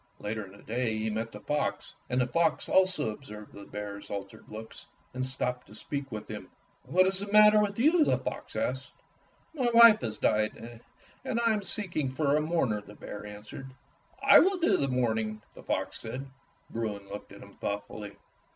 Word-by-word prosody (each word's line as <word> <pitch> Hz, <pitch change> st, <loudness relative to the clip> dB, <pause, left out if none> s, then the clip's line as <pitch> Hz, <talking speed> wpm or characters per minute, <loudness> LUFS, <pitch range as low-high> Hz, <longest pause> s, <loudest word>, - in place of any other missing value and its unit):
Later 105 Hz, 0 st, -4 dB
in 95 Hz, +2 st, -14 dB
the -, -, -17 dB
day 115 Hz, 0 st, -1 dB
he 110 Hz, 0 st, -1 dB
met 110 Hz, +2 st, -3 dB
the 105 Hz, -, -10 dB
fox, 150 Hz, 0 st, -2 dB, 0.2 s
and 125 Hz, 0 st, +1 dB
the 125 Hz, -, +3 dB
fox 160 Hz, +5 st, +1 dB
also 185 Hz, -10 st, +3 dB
observed 105 Hz, -3 st, -10 dB
the 100 Hz, 0 st, -10 dB
bear's 100 Hz, -1 st, -7 dB
altered 100 Hz, -1 st, -6 dB
looks 110 Hz, +1 st, -9 dB, 0.3 s
and 130 Hz, 0 st, -2 dB
stopped 125 Hz, -1 st, -2 dB
to 105 Hz, -, -14 dB
speak 140 Hz, +1 st, -5 dB
with 105 Hz, -1 st, -6 dB
him. -, -, -7 dB, 0.4 s
"What 185 Hz, +2 st, +4 dB
is 190 Hz, 0 st, 0 dB
the 200 Hz, 0 st, -5 dB
matter 210 Hz, 0 st, +8 dB
with 205 Hz, -1 st, -1 dB
you.^^" 310 Hz, +7 st, +5 dB
the -, -, +3 dB
fox -, -, -6 dB
asked. -, -, -2 dB, 0.6 s
"My 260 Hz, -6 st, +1 dB
wife 230 Hz, -2 st, +9 dB
has 110 Hz, -3 st, -3 dB
died, 105 Hz, 0 st, +2 dB, 0.7 s
and 235 Hz, -, -1 dB
I 230 Hz, -1 st, +3 dB
am 210 Hz, -, -1 dB
seeking 175 Hz, -7 st, -2 dB
for 140 Hz, +2 st, +1 dB
a 155 Hz, -, +3 dB
mourner," 150 Hz, -10 st, 0 dB
the 105 Hz, 0 st, -14 dB
bear 105 Hz, 0 st, -8 dB
answered. 105 Hz, +6 st, -9 dB, 0.5 s
"I -, -, +9 dB
will 385 Hz, +2 st, +3 dB
do 345 Hz, -1 st, +3 dB
the 140 Hz, -, +1 dB
mourning," 110 Hz, -4 st, 0 dB
the -, -, -12 dB
fox -, -, -2 dB
said. 125 Hz, +4 st, -6 dB, 0.5 s
Bruin 105 Hz, -3 st, -3 dB
looked 100 Hz, +1 st, -8 dB
at -, -, -11 dB
him -, -, -14 dB
thoughtfully. 100 Hz, 0 st, -5 dB
125 Hz, 190 wpm, -29 LUFS, -, 0.7 s, wife